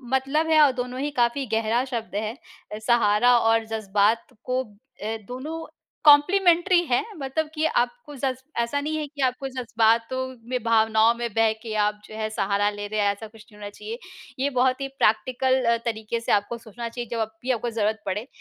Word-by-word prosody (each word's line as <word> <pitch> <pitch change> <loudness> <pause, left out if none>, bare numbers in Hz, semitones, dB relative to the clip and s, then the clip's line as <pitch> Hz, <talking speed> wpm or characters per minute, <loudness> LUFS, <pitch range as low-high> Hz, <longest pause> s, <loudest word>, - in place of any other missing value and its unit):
मतलब 275 +5 +1
है 315 -1 +5
और 290 -2 +6
दोनों 250 +1 -6
ही 290 +2 -2
काफ़ी 245 +1 +1
गहरा 225 +2 +1
शब्द 235 -6 -5
है 215 +2 -2 0.5
सहारा 235 +1 +4
और 225 0 +2
ज़ज़्बात 215 0 +1 0.2
को 255 +1 -1 0.4
अ, 220 +1 -2
दोनों 305 +6 -6 0.4
कॉम्प्लीमेंट्री 345 +4 +5
हैं। 245 - +2 0.2
मतलब 290 +3 -2
कि 315 0 0
आपको 295 - -1
जज़् 265 -1 -1 0.3
ऐसा 235 +5 -1
नहीं 310 +2 -2
है 305 - -2
कि 290 0 -8
आपको 260 +1 0
ज़ज़्बातों 235 0 +1 0.2
में, 250 -1 -1
भावनाओं 225 0 +4
में 240 0 -2
बह 225 0 +3
के 225 -2 -5
आप 210 0 -2
जो 215 - -11
है 215 0 -2
सहारा 205 -1 +1
ले 205 0 -6
रहे 215 +1 -3
हैं, 205 -1 +3
ऐसा 205 +2 -8
कुछ 220 +1 -16
नहीं 210 - -16
होना 205 -1 -6
चाहिए। 210 +2 -7 0.4
ये 275 +2 +1
बहुत 255 +1 +2
ही 275 - -1
प्रैक्टिकल 260 +1 +1
अ, 235 0 +3
तरीक़े 225 0 -2
से 230 - -3
आपको 205 +3 +1
सोचना 230 +1 -7
चाहिए। 240 0 -6
जब 225 -2 -1
भी 260 - -1
आपको 240 -1 -1
ज़रूरत 220 -1 -1
पड़े, 205 +5 -3
235 Hz, 190 wpm, -24 LUFS, 220-265 Hz, 0.5 s, और